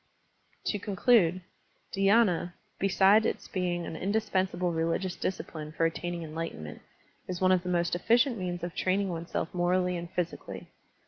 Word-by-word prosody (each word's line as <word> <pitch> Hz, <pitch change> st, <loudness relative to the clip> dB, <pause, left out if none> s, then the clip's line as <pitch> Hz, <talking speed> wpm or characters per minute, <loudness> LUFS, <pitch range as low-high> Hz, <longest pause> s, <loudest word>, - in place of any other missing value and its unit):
To 205 Hz, -, 0 dB
conclude. 195 Hz, -3 st, +3 dB, 0.5 s
Dhyina, 195 Hz, -3 st, +3 dB, 0.3 s
beside 195 Hz, +2 st, +5 dB
its -, -, -2 dB
being 175 Hz, -2 st, -2 dB
an -, -, -6 dB
indispensable 190 Hz, -2 st, 0 dB
religious 165 Hz, +3 st, -1 dB
discipline 155 Hz, -4 st, -4 dB
for 165 Hz, -, +1 dB
attaining 175 Hz, +1 st, -2 dB
enlightenment, 155 Hz, -, -6 dB, 0.5 s
is 180 Hz, -1 st, -4 dB
one 185 Hz, 0 st, +4 dB
of 185 Hz, -1 st, +4 dB
the 180 Hz, -, -5 dB
most 175 Hz, -1 st, +1 dB
efficient 235 Hz, +8 st, +3 dB
means 175 Hz, -1 st, -3 dB
of 175 Hz, -1 st, -4 dB
training 195 Hz, +1 st, 0 dB
oneself 170 Hz, +1 st, -3 dB
morally 180 Hz, 0 st, +1 dB
and 170 Hz, 0 st, -5 dB
physically. 175 Hz, -1 st, -4 dB
180 Hz, 140 wpm, -29 LUFS, 170-195 Hz, 0.5 s, beside